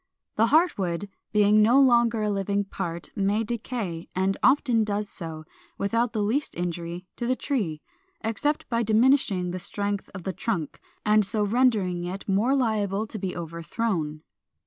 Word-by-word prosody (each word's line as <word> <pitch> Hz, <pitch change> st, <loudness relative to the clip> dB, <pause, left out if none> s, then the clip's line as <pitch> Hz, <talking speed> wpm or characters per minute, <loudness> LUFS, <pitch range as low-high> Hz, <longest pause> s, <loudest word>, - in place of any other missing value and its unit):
The 225 Hz, +2 st, +4 dB
heart 315 Hz, -, +3 dB
wood, 185 Hz, +2 st, -2 dB, 0.2 s
being 210 Hz, 0 st, +5 dB
no 235 Hz, +6 st, +5 dB
longer 235 Hz, -4 st, +4 dB
a 210 Hz, -, +1 dB
living 200 Hz, 0 st, 0 dB
part, 170 Hz, -4 st, -5 dB
may 200 Hz, +3 st, +1 dB
decay, 220 Hz, -7 st, -4 dB
and 190 Hz, +1 st, +1 dB
often 250 Hz, -4 st, +4 dB
does 210 Hz, 0 st, -2 dB
so, 160 Hz, -5 st, -7 dB, 0.3 s
without 230 Hz, +4 st, 0 dB
the 215 Hz, -2 st, -1 dB
least 255 Hz, +8 st, -1 dB
injury 175 Hz, 0 st, -4 dB
to 240 Hz, -, -2 dB
the 255 Hz, -, +2 dB
tree, 200 Hz, -, -2 dB, 0.4 s
except 290 Hz, +7 st, -1 dB
by 230 Hz, -1 st, 0 dB
diminishing 220 Hz, -5 st, +3 dB
the 185 Hz, -, -4 dB
strength 200 Hz, +1 st, -2 dB
of 185 Hz, -, -7 dB
the 190 Hz, -, -3 dB
trunk, 180 Hz, -5 st, -3 dB, 0.3 s
and 210 Hz, 0 st, +5 dB
so 210 Hz, +2 st, 0 dB
rendering 205 Hz, -6 st, +2 dB
it 185 Hz, +3 st, -5 dB
more 210 Hz, +8 st, +2 dB
liable 215 Hz, -5 st, 0 dB
to 220 Hz, 0 st, -7 dB
be 185 Hz, -1 st, -4 dB
overthrown. 165 Hz, -1 st, -3 dB
205 Hz, 160 wpm, -26 LUFS, 185-230 Hz, 0.4 s, being